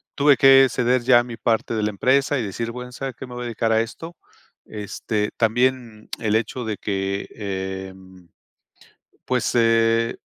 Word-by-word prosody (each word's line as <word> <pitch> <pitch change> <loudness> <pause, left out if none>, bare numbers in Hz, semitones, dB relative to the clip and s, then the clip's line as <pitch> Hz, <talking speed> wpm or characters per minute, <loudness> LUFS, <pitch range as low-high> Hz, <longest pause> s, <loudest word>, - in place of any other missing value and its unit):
tuve 145 -1 +4
que 135 -1 +7
ceder 125 +1 +1
ya 120 0 +5
mi 120 -1 -7
parte 115 0 -1
de 110 -1 -1
la 105 - +1
empresa 135 +7 +1
y - - -2
decir, 115 +3 -4
bueno, 125 +1 -8
¿saben 135 +1 -5
qué? 130 - -7
Me 125 - -10
voy 120 - -6
a - - -5
dedicar 115 -1 -1
a 110 - +3
esto. 165 +9 -7 0.5
Este, 105 0 -4
también, 120 -1 0
mm, - - -22 0.2
el 105 -1 +1
hecho 120 +3 -4
de 110 -2 -4
que, 100 -1 -3
em, 95 -2 -7 1.0
pues, 125 -2 0
eh, 115 0 +2
115 Hz, 175 wpm, -22 LUFS, 105-125 Hz, 1.0 s, que